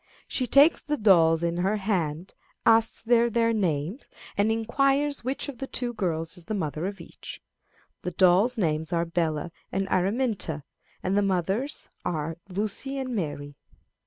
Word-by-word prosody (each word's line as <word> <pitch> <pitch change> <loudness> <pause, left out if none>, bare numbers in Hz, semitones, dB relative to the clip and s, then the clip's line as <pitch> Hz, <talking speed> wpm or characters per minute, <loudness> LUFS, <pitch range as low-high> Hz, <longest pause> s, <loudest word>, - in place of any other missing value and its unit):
She 255 - -1
takes 285 +7 +5
the 295 0 -2
dolls 170 -6 +4
in 170 0 0
her 190 +4 +1
hand, 180 -5 -2 0.3
asks 225 0 +5
their 235 0 +4
names, 210 - 0 0.3
and 205 +2 +2
inquires 275 +6 +1
which 260 +4 -3
of 270 -5 -8
the 270 - -4
two 245 -2 -3
girls 165 -6 -2
is 175 - -11
the 215 - -3
mother 160 -2 -2
of 200 0 -6
each. - - -10 0.6
The - - -3
dolls' 190 +7 +3
names 160 -5 -1
are 170 -1 +1
Bella 165 -1 -1 0.2
and 195 0 -1
Araminta, 195 - 0 0.4
and 185 - 0
the 205 - +4
mothers' 195 - -1
are 160 -1 -3
Lucy 215 +8 -3
and 260 -2 -3
Mary. 145 -6 -4
195 Hz, 155 wpm, -26 LUFS, 170-235 Hz, 0.6 s, takes